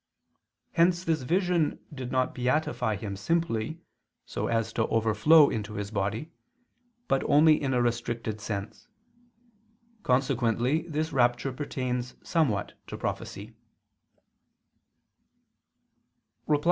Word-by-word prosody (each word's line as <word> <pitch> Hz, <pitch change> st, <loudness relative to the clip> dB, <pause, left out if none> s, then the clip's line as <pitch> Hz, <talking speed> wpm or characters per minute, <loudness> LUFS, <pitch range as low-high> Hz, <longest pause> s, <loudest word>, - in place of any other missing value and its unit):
Hence 175 Hz, +1 st, +3 dB
this 160 Hz, -4 st, 0 dB
vision 175 Hz, +2 st, +1 dB, 0.2 s
did 130 Hz, -3 st, -6 dB
not 130 Hz, -1 st, +1 dB
beatify 125 Hz, -4 st, 0 dB
him 100 Hz, -1 st, -5 dB
simply, 160 Hz, -, -1 dB, 0.4 s
so -, -, -3 dB
as 115 Hz, -1 st, 0 dB
to 110 Hz, -, 0 dB
overflow 115 Hz, +8 st, +5 dB
into 105 Hz, -1 st, -4 dB
his 105 Hz, 0 st, -4 dB
body, 105 Hz, +8 st, -2 dB, 0.8 s
but 135 Hz, -, +1 dB
only 155 Hz, +1 st, +5 dB
in 135 Hz, -2 st, 0 dB
a 120 Hz, -, +3 dB
restricted 115 Hz, -2 st, -2 dB
sense. 100 Hz, 0 st, -5 dB, 1.1 s
Consequently 130 Hz, -, +1 dB
this 155 Hz, -1 st, -2 dB
rapture 120 Hz, +1 st, +2 dB
pertains 125 Hz, -3 st, -3 dB
somewhat 135 Hz, -, 0 dB
to -, -, -6 dB
prophecy. 105 Hz, +4 st, -5 dB
125 Hz, 100 wpm, -28 LUFS, 110-155 Hz, 1.1 s, overflow